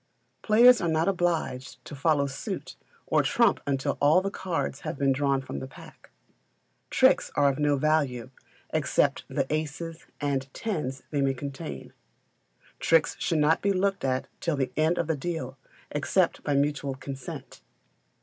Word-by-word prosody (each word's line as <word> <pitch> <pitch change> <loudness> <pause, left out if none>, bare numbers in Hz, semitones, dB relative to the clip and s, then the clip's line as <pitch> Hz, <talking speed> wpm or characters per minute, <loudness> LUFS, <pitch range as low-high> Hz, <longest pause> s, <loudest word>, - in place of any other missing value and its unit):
Players 235 +2 +6
are 170 - 0
not 160 0 +1
obliged 170 -9 -1
to - - -9
follow 145 0 +2
suit 135 -1 -5 0.3
or - - +3
trump - - +3
until 135 -1 -1
all 150 +5 +6
the 195 +1 -3
cards 165 -9 -3
have - - -5
been 140 -1 +2
drawn 135 0 +1
from 70 - -6
the 65 - -6
pack. - - -15 0.8
Tricks - - +3
are 145 -1 +4
of 140 - -3
no 145 -1 +3
value, 135 -4 0 0.4
except - - +1
for - - -11
the - - 0
aces 160 +2 -4
and 135 -2 -2
tens 150 - -3
they 145 -2 0
may 135 -1 +1
contain. 140 +4 -7 0.9
Tricks 165 -1 +3
should 165 - 0
not 150 +2 +3
be 200 - +2
looked 195 +1 0
at 130 -1 0
till 165 -3 -1
the 135 -2 -1
end 160 +3 +2
of - - 0
the 160 0 0
deal, 140 -3 -4 0.4
except 165 +4 +1
by 145 - 0
mutual 140 -1 0
consent. 135 -1 -8
145 Hz, 160 wpm, -27 LUFS, 135-165 Hz, 0.9 s, Players